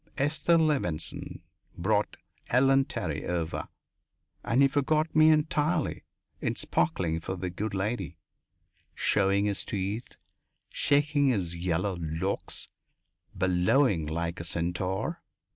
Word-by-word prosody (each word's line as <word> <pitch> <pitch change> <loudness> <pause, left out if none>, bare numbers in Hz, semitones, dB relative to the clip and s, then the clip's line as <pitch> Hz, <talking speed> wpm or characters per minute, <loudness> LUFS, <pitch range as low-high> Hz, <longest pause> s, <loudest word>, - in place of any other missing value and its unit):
Esther 155 +4 +2
Levenson 140 - -1 0.4
brought 105 +4 0 0.3
Ellen 135 +2 +4
Terry 90 - -3
over 85 -2 -2 0.8
and 125 +4 +3
he - - +7
forgot 155 +3 +1
me 155 0 +7
entirely 155 0 +1 0.4
in - - -1
sparkling 80 -2 0
for 95 +3 -4
the 90 -1 -4
good 105 +3 -3
lady 100 -3 -2 0.8
showing 100 0 +2
his 100 -2 -1
teeth, 105 +2 -4 0.6
shaking 145 0 +2
his 95 -9 0
yellow 90 +2 -1
locks, 80 +4 -2 0.7
bellowing 90 - +2
like 85 +2 -3
a - - -4
centaur. 90 +2 -2
100 Hz, 110 wpm, -28 LUFS, 85-140 Hz, 0.8 s, he